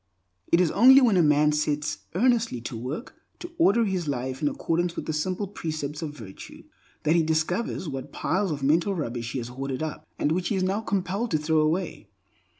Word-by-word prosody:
It 170 - +5
is 180 -3 +3
only 260 +6 +8
when 240 -7 +4
a 180 - +5
man 150 -1 +4
sets 150 0 -1 0.2
earnestly 235 - +2
to 120 - -6
work 130 - -5 0.2
to 345 - -9
order 230 -6 +4
his 185 -5 -2
life 130 0 -3
in 150 - +2
accordance 170 +3 -1
with - - -5
the 155 - -2
simple 185 +6 -2
precepts 155 -5 -5
of 150 -2 -5
virtue, 100 -6 -11 0.4
that 155 +2 +3
he 170 - +4
discovers 160 +5 -1
what 135 -3 -6
piles 185 +6 -1
of 145 -3 -4
mental 165 +7 +2
rubbish 120 -7 -4
he - - -2
has 120 -1 -4
hoarded 135 +2 -4
up, 155 0 -6
and 145 - 0
which 175 +2 0
he 215 - 0
is 185 - 0
now 195 +3 0
compelled 200 +2 -2
to 155 - +2
throw 155 +1 +1
away. 160 +4 -1
160 Hz, 205 wpm, -26 LUFS, 145-190 Hz, 0.4 s, only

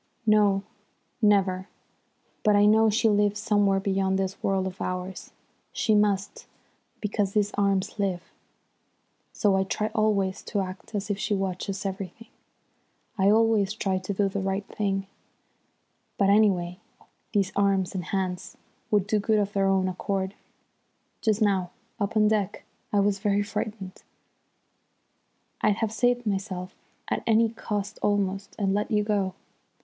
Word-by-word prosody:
"No, 205 -2 +4 0.6
never. 195 -3 +3 0.7
But 210 -2 +4
I 205 0 +5
know 220 +1 +5
she 225 +2 +2
lives 210 -1 +2
somewhere 205 -3 +2
beyond 190 -1 0
this 195 0 -3
world 195 -1 +1
of 190 0 -6
ours. 185 +1 -4 0.4
She 230 -3 +1
must, 205 -1 +1 0.5
because 205 -2 -1
these 205 -1 +1
arms 200 +1 0
live. 185 -3 -1 1.1
So 205 -3 +2
I 190 - +2
try 210 +3 -2
always 200 -4 +1
to 205 - -1
act 185 +3 -7
as 205 +1 -2
if 200 - -2
she 210 - 0
watches 195 +1 -3
everything. 195 +3 -6 0.9
I 190 +1 +5
always 215 -2 +3
try 190 -3 0
to 185 +2 -5
do 200 0 +1
the 195 +1 -3
right 195 +1 -2
thing, 195 -2 -1 1.1
but, 200 -1 +4
anyway, 185 -4 +2 0.5
these 200 -3 +1
arms 195 -2 +2
and 180 -3 -4
hands 190 -1 -3 0.3
would 205 -3 +2
do 215 +1 +1
good 215 +1 +2
of 205 0 0
their 195 -1 +2
own 190 -1 +2
accord. 190 +1 -2 0.9
Just 220 -1 +2
now 190 -4 +1 0.3
up 210 +2 -1
on 215 - +5
the 210 - +4
deck 205 -2 -1 0.3
I 205 - +3
was 200 0 +2
very 205 0 +1
frightened. 205 -2 -5 1.6
I'd 210 -1 +3
have 225 0 -1
saved 245 +1 +1
myself 190 -2 -3 0.3
at - - -1
any 225 0 +4
cost 210 -2 -4
almost, 195 -1 -1
and 195 -2 +1
let 210 +1 -1
you 210 -2 +2
go. 200 -3 0
200 Hz, 145 wpm, -26 LUFS, 190-210 Hz, 1.6 s, I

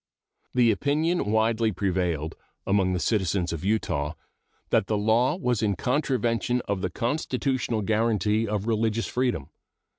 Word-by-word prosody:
The 120 -2 +5
opinion 150 - +1
widely 110 0 +2
prevailed 90 -5 -1 0.3
among 95 -2 +2
the 90 - 0
citizens 95 -4 0
of 80 - -5
Utah 80 -8 -1 0.6
that - - +3
the 105 - 0
law 115 +7 +2
was 125 - 0
in 105 -3 +1
contravention 125 - 0
of 100 -4 -3
the 95 - -1
constitutional 125 - -1
guaranty 110 0 +1
of 105 -1 -2
religious 115 0 0
freedom. 120 - -1
110 Hz, 130 wpm, -26 LUFS, 95-120 Hz, 0.6 s, The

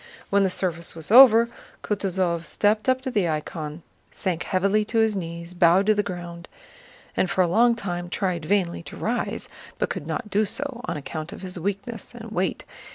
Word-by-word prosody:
When 200 0 +4
the 195 - +3
service 170 -3 -2
was 160 +3 -6
over, 235 -2 +9 0.4
Kutúzov 185 -4 -1
stepped 215 +6 +1
up 260 0 +2
to 260 - -3
the 200 -7 +1
icon, 155 0 -4 0.3
sank 180 -3 -2
heavily 200 +3 +1
to 225 - -2
his 220 -1 +3
knees, 170 -1 -6
bowed 175 +2 +4
to 215 - +5
the 205 - +1
ground, 175 -3 -7 0.7
and 185 - +1
for 185 - +2
a - - +1
long 235 +6 +4
time 175 -5 -4
tried 180 -3 -1
vainly 180 -1 0
to 150 - -10
rise, 240 +3 -2 0.3
but - - -1
could - - -5
not 210 -4 -4
do 210 +2 +3
so 265 +3 -3
on 170 - -3
account 155 +2 -6
of - - -9
his 180 -1 -5
weakness 205 +7 -4
and 225 -2 -9
weight. 185 -2 -1
190 Hz, 190 wpm, -24 LUFS, 170-215 Hz, 0.7 s, over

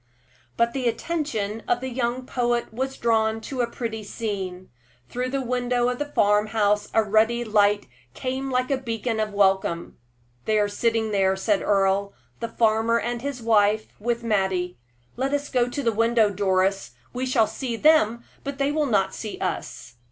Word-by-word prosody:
But 235 0 +2
the 260 -3 -1
attention 230 -6 -2
of 240 - +2
the 260 +1 -4
young 245 +1 -2
poet 240 -3 -1
was 265 +3 -3
drawn 225 -1 +1
to 255 +2 -3
a 235 - 0
pretty 225 -2 -4
scene. 195 -4 -5 0.4
Through 250 +1 -2
the 270 0 -2
window 245 0 +1
of 250 - -3
the 295 - -2
farm 210 -3 +3
house 210 -1 +1
a 225 - +3
ruddy 220 +3 +2
light 205 -2 +2 0.3
came 265 +1 -3
like 255 +1 0
a 270 - +1
beam 230 -2 -2
of 215 -1 -1
welcome. 190 -6 +1 0.5
"They 215 -1 +2
are 205 -1 +3
sitting 225 +1 0
there," 190 -2 +2
said 195 +1 +1
Earle 200 0 +1 0.3
"the 230 - -2
farmer 225 +1 +2
and 240 0 -3
his 270 -3 -5
wife, 215 -1 +3
with 235 +2 -1
Mattie. 190 -5 0 0.4
Let 270 +3 0
us 285 0 -3
go 245 -2 +1
to 280 +3 -4
the 230 - +2
window, 230 -1 +3
Doris; 195 0 0 0.2
we 255 +1 -2
shall 245 -3 +3
see 245 +1 -4
them, 235 -4 +4 0.2
but 280 -1 -5
they 280 +1 +1
will 300 -1 +1
not 195 -5 +1
see 215 -2 -6
us." 120 -9 -5
225 Hz, 175 wpm, -24 LUFS, 205-250 Hz, 0.5 s, them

